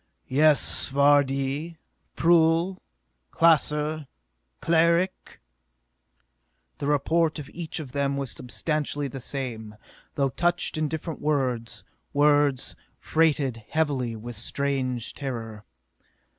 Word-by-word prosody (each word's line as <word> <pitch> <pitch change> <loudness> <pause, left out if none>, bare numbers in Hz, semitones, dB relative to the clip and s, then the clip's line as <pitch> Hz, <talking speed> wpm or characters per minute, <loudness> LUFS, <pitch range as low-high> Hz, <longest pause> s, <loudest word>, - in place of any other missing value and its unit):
"Yes, 150 +2 +4
Vardee? 140 +2 +2 0.4
Prull? 170 +2 +3 0.5
Klaser? 155 -2 +2 0.5
Cleric?" 170 +3 +1 1.4
The 140 - -3
report 155 +3 +1
of 145 -3 -7
each 165 -2 -5
of 140 -5 -7
them 140 0 -1
was 135 -4 -3
substantially 145 - -3
the 135 0 -7
same, 120 -5 -5 0.4
though 135 -2 +1
couched 175 +5 0
in 155 0 0
different 160 +1 -5
words, 130 -6 -1 0.3
words 145 -2 +2 0.2
freighted 145 -6 +1
heavily 140 -7 0
with 120 +2 -7
strange 130 +1 -2
terror. 115 -6 -6
145 Hz, 95 wpm, -26 LUFS, 130-160 Hz, 1.4 s, Yes